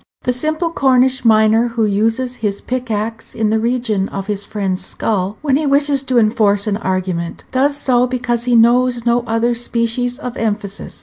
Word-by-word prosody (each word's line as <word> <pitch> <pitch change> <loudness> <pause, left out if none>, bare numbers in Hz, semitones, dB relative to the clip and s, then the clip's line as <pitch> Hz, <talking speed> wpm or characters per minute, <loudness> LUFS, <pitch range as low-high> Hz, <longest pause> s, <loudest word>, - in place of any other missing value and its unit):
The 250 - 0
simple 310 +6 -1
Cornish 260 -4 +2
miner 220 +1 +4
who 230 -1 0
uses 225 +5 0
his 200 -2 -2
pickaxe 225 -3 -4
in 220 -1 0
the 220 - +2
region 225 -4 -1
of 195 -1 -5
his 205 -1 -4
friend's 195 -3 -3
skull 200 -1 -2
when 275 -3 +2
he 300 0 -1
wishes 280 0 +2
to 255 - +2
enforce 215 -3 +2
an 205 -2 -1
argument, 185 -4 -3
does 280 +2 +1
so 250 -3 +2
because 240 -1 -2
he 245 -1 +2
knows 240 +1 +3
no 240 0 +2
other 230 +2 +1
species 240 +1 -1
of 250 -4 -6
emphasis. 205 -2 -4
235 Hz, 175 wpm, -17 LUFS, 215-250 Hz, -, miner